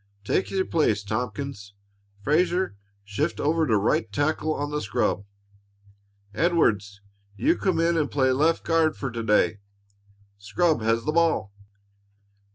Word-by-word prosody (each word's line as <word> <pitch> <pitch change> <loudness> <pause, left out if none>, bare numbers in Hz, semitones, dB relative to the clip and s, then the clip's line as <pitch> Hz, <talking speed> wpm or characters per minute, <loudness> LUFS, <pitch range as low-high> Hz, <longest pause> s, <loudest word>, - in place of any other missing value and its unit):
Take 145 - 0
your 190 -1 0
place, 110 -11 +1
Tompkins. 110 -1 -5 0.5
Frazer, 175 - +1 0.3
shift 100 +1 -2
over 160 +1 +1
to 110 -4 +3
right 105 +1 0
tackle 155 +6 0
on 145 -1 -3
the 150 0 -2
scrub. 100 -1 -1 1.1
Edwards, 105 - +1 0.4
you 320 +5 +2
come 185 - 0
in 170 +1 +2
and 150 -3 0
play 130 -2 +2
left 155 +5 +2
guard 165 -2 +2
for 135 - -4
to 115 0 -4
day. 105 -1 +2 0.8
Scrub 155 - +1
has 115 +1 0
the 155 - +1
ball." 160 -11 +1
145 Hz, 135 wpm, -25 LUFS, 105-165 Hz, 1.1 s, to